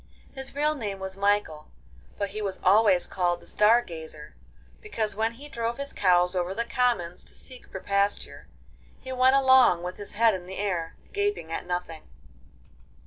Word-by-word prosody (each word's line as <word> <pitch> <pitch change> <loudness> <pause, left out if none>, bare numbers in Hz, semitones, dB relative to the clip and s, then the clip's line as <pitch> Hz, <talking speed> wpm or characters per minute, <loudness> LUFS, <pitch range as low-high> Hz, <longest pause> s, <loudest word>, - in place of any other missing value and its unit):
His 265 0 -6
real 300 +1 +2
name 210 -9 -4
was 190 0 -4
Michael, 200 -6 0 0.5
but 200 -1 -2
he 215 +2 -5
was 195 -2 -2
always 195 -1 +5
called 175 -2 -1
the - - -17
Star 225 +3 +4
Gazer, 160 -5 -8 0.5
because 225 - -3
when 220 +3 -1
he 280 +5 -11
drove 235 -4 -3
his 280 0 -4
cows 180 -1 +3
over 180 +1 -1
the 235 - -1
commons 235 -9 0
to - - -14
seek 255 -2 -8
for 190 - -6
pasture, 200 +1 -1 0.5
he 260 - -8
went 260 +1 +4
along 260 -10 +5
with 180 +1 -5
his 205 - -6
head 225 +1 +4
in 180 -2 -6
the 190 - -7
air, 180 -5 -2 0.2
gaping 410 - -1
at 175 - -4
nothing. 175 -2 -4
205 Hz, 175 wpm, -27 LUFS, 180-245 Hz, 0.5 s, always